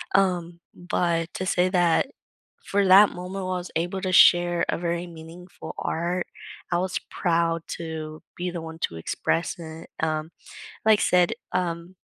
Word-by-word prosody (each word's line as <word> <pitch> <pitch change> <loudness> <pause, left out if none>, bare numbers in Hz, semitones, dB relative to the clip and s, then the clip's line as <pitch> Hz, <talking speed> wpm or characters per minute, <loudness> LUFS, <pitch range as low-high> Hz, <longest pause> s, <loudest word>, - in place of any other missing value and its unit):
Um, 175 -3 +1
but 170 -1 -1
to 185 - -3
say 180 -1 +2
that 175 +1 +3 0.6
for 200 0 +2
that 195 +2 +8
moment, 185 +2 -6
while 185 0 -2
I - - -1
was 180 0 -7
able 175 +4 -1
to 185 - -1
share 175 -1 +6
a - - +1
very 170 0 -2
meaningful 170 +2 -10
art, 175 +2 -1 0.5
I 175 - +3
was 185 0 -1
proud 165 -2 +1 0.2
to 155 -2 -6
be 180 +1 -2
the 175 -1 -5
one 160 0 -8
to 85 - -11
express 125 - -1
it. 160 -1 -9
Um, 155 0 -1 0.6
like 215 -1 +5
said, 180 -1 +3 0.2
um, 175 0 -2
175 Hz, 160 wpm, -25 LUFS, 165-180 Hz, 0.6 s, that